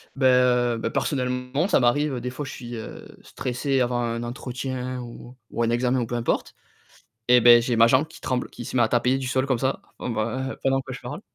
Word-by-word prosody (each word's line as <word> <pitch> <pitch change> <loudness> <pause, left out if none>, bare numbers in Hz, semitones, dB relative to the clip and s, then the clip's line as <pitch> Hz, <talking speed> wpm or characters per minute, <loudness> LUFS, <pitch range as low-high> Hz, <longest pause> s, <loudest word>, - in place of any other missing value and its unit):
Beh, 135 -1 0
heu, 125 -2 +3
beh, 115 - -2
personnellement, 125 +4 -1
ça 200 - +3
m'arrive, 135 +2 +1
des 125 - -4
fois 140 +4 -5
je - - -7
suis, 120 -1 -8
heu, 110 - -8 0.2
stressé 130 +2 -2
avant 120 -1 +1
un 115 0 -2
entretien 125 +1 -5
ou 120 +1 -10 0.2
ou 115 - -1
un 115 - +1
examen 125 +2 +1
ou 120 - -1
peu 120 - -3
importe 120 -1 -1 0.7
et 125 - +7
beh, 120 0 +8
j'ai 120 -1 -1
ma 115 +1 +7
jambe 130 +5 +3
qui 165 - -14
tremble, 125 -1 -2
qui 120 - -9
se - - -6
met 120 - +4
à 110 - +1
taper 125 +2 +2
du 135 -1 -4
sol 130 0 +1
comme 130 -3 +1
ça 130 +1 -1 0.2
b - - -3
b - - -6
heu, 130 +5 -2
pendant 135 0 +1
que 130 - -9
je 135 - -7
parle. 150 +6 -7
125 Hz, 240 wpm, -24 LUFS, 120-130 Hz, 0.7 s, beh